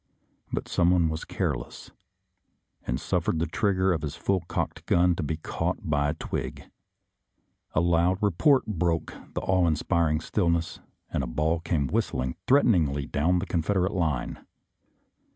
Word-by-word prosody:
But -, -, -3 dB
someone 85 Hz, -1 st, +3 dB
was 80 Hz, 0 st, -4 dB
careless, -, -, -4 dB, 1.0 s
and 65 Hz, +2 st, -1 dB
suffered 85 Hz, 0 st, 0 dB
the 80 Hz, -, +1 dB
trigger 95 Hz, -2 st, +1 dB
of 80 Hz, -, -2 dB
his 75 Hz, 0 st, -4 dB
full 100 Hz, -1 st, 0 dB
cocked -, -, -3 dB
gun 90 Hz, 0 st, +4 dB
to -, -, -3 dB
be 80 Hz, +1 st, -2 dB
caught 80 Hz, -, -3 dB
by 75 Hz, -1 st, +1 dB
a -, -, 0 dB
twig. -, -, -4 dB, 1.1 s
A 80 Hz, -, +4 dB
loud 85 Hz, +2 st, +3 dB
report 105 Hz, -, +3 dB
broke 85 Hz, -5 st, -1 dB, 0.2 s
the -, -, -1 dB
awe 95 Hz, -2 st, +2 dB
inspir 85 Hz, +2 st, +1 dB
ing 75 Hz, 0 st, +1 dB
stillness, 85 Hz, -2 st, 0 dB, 0.3 s
and -, -, 0 dB
a -, -, -3 dB
ball 75 Hz, +7 st, 0 dB
came 80 Hz, -3 st, 0 dB
whistling 65 Hz, 0 st, -1 dB
threaten 135 Hz, -2 st, +5 dB
ingly 70 Hz, -5 st, 0 dB
down 85 Hz, +5 st, +2 dB
the 90 Hz, -, -1 dB
Confederate 90 Hz, +2 st, 0 dB
line. 80 Hz, -9 st, -2 dB
85 Hz, 150 wpm, -27 LUFS, 75-90 Hz, 1.1 s, threaten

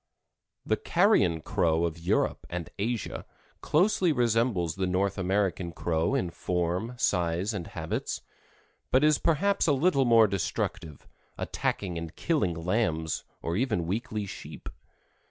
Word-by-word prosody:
The -, -, +1 dB
Carrion 85 Hz, -3 st, +3 dB
Crow 80 Hz, +1 st, +1 dB
of 85 Hz, 0 st, -3 dB
Europe 85 Hz, -, 0 dB
and 85 Hz, -2 st, -5 dB
Asia 115 Hz, +2 st, -2 dB, 0.4 s
closely 180 Hz, +1 st, +3 dB
resembles 115 Hz, -, +1 dB
the 95 Hz, -1 st, -1 dB
North 95 Hz, +2 st, +1 dB
American 95 Hz, -2 st, 0 dB
Crow 85 Hz, +8 st, 0 dB
in 90 Hz, -11 st, -1 dB
form, 90 Hz, +7 st, -2 dB
size 90 Hz, -1 st, 0 dB
and 95 Hz, -5 st, -4 dB
habits, -, -, -4 dB, 0.7 s
but 130 Hz, +3 st, +4 dB
is 150 Hz, -1 st, +4 dB
perhaps 185 Hz, +4 st, +2 dB
a 150 Hz, -, +4 dB
little 140 Hz, -1 st, +3 dB
more 115 Hz, -2 st, +6 dB
destructive, 85 Hz, -5 st, -3 dB, 0.3 s
attacking 90 Hz, -4 st, -2 dB
and 85 Hz, -1 st, -7 dB
killing 145 Hz, -, 0 dB
lambs, 85 Hz, -3 st, -1 dB, 0.2 s
or 85 Hz, -, -1 dB
even 110 Hz, -6 st, 0 dB
weakly 105 Hz, +3 st, -2 dB
sheep. 95 Hz, -, -8 dB
95 Hz, 130 wpm, -28 LUFS, 85-120 Hz, 0.7 s, more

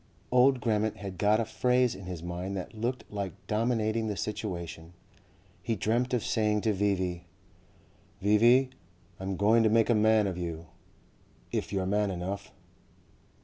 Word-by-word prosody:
Old 125 Hz, +1 st, +4 dB
Grammont 110 Hz, -2 st, 0 dB
had 95 Hz, -3 st, -7 dB
got 105 Hz, +1 st, +3 dB
a 115 Hz, -, 0 dB
phrase 125 Hz, +2 st, +2 dB
in 95 Hz, -, -10 dB
his 90 Hz, -3 st, -6 dB
mind 90 Hz, +3 st, -4 dB
that 95 Hz, -, -6 dB
looked 120 Hz, +4 st, -3 dB
like 100 Hz, -4 st, -3 dB
dominating 110 Hz, 0 st, 0 dB
the 105 Hz, -2 st, -3 dB
situation. 90 Hz, -6 st, -5 dB, 0.7 s
He 115 Hz, -, -1 dB
dreamt 115 Hz, +5 st, 0 dB
of 120 Hz, -, -2 dB
saying 105 Hz, -2 st, +1 dB
to 110 Hz, 0 st, +1 dB
V.V.: 95 Hz, -3 st, -1 dB, 0.9 s
"V.V., 120 Hz, +6 st, +4 dB, 0.5 s
I'm 95 Hz, 0 st, -3 dB
going 110 Hz, +3 st, +4 dB
to 110 Hz, -, +4 dB
make 115 Hz, +2 st, +3 dB
a -, -, +5 dB
man 110 Hz, 0 st, +4 dB
of 90 Hz, -2 st, -3 dB
you 85 Hz, -1 st, -5 dB, 0.9 s
if -, -, -2 dB
you're 95 Hz, -2 st, -1 dB
man 105 Hz, +2 st, +1 dB
enough." 95 Hz, +3 st, -5 dB
105 Hz, 150 wpm, -29 LUFS, 95-115 Hz, 0.9 s, a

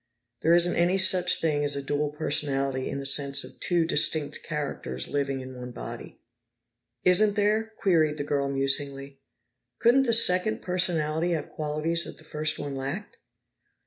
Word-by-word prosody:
There 165 Hz, +2 st, +4 dB
isn't 175 Hz, 0 st, +3 dB
any 175 Hz, +2 st, +2 dB
such 185 Hz, -1 st, +4 dB
thing 150 Hz, -3 st, 0 dB
as 145 Hz, -1 st, -1 dB
a 140 Hz, -, -3 dB
dual 145 Hz, +1 st, -1 dB
personality 140 Hz, -3 st, 0 dB
in -, -, -4 dB
the 140 Hz, -, -6 dB
sense 140 Hz, 0 st, +1 dB
of -, -, -13 dB
two 175 Hz, -2 st, +1 dB
distinct 155 Hz, -1 st, +1 dB
characters 100 Hz, -, -4 dB
living 140 Hz, -2 st, -2 dB
in 130 Hz, 0 st, -9 dB
one 125 Hz, 0 st, -8 dB
body." 120 Hz, -, -9 dB, 0.9 s
"Isn't 200 Hz, +3 st, +4 dB
there?" 215 Hz, +2 st, 0 dB
queried 155 Hz, -5 st, +2 dB
the 145 Hz, -, -3 dB
girl 140 Hz, -1 st, -1 dB
musingly. 135 Hz, 0 st, 0 dB, 0.6 s
"Could 265 Hz, +3 st, +3 dB
the 230 Hz, -, +2 dB
second 215 Hz, -2 st, +3 dB
personality 170 Hz, -2 st, 0 dB
have 160 Hz, -, -4 dB
qualities 155 Hz, +2 st, -1 dB
that -, -, -9 dB
the -, -, -15 dB
first 155 Hz, 0 st, -2 dB
one 145 Hz, -1 st, -5 dB
lacked?" 140 Hz, +10 st, -6 dB
150 Hz, 160 wpm, -26 LUFS, 140-175 Hz, 0.9 s, There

